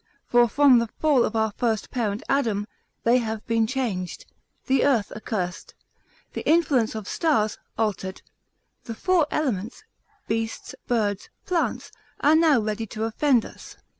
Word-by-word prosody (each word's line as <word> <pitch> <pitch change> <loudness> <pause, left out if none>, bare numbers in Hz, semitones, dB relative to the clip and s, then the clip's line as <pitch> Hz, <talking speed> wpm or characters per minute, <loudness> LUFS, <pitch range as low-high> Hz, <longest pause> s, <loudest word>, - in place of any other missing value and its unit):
For 240 -1 +4
from 275 -1 +5
the 230 - -1
fall 280 +1 +2
of 220 - -2
our 220 -1 +1
first 225 -3 -1
parent 220 -4 -2
Adam, 225 -7 0 0.4
they 240 +2 +4
have 220 -2 -4
been 225 -1 +1
changed, 220 -8 -3 0.4
the 265 0 +2
earth 240 -8 +2
accursed, 195 -5 -4 0.6
the - - -4
influence 290 -9 +3
of 215 -2 -6
stars, 220 -11 0 0.2
altered, 195 -4 -2 0.6
the 230 - -6
four 355 +2 +2
elements, 245 - -2 0.4
beasts, 225 0 -3
birds, 205 -4 -1 0.2
plants, 355 -3 -1 0.3
are 295 - +4
now 315 -5 +5
ready 215 +1 -3
to 215 +2 -5
offend 240 +2 +2
us. - - -12
230 Hz, 140 wpm, -24 LUFS, 215-270 Hz, 0.6 s, from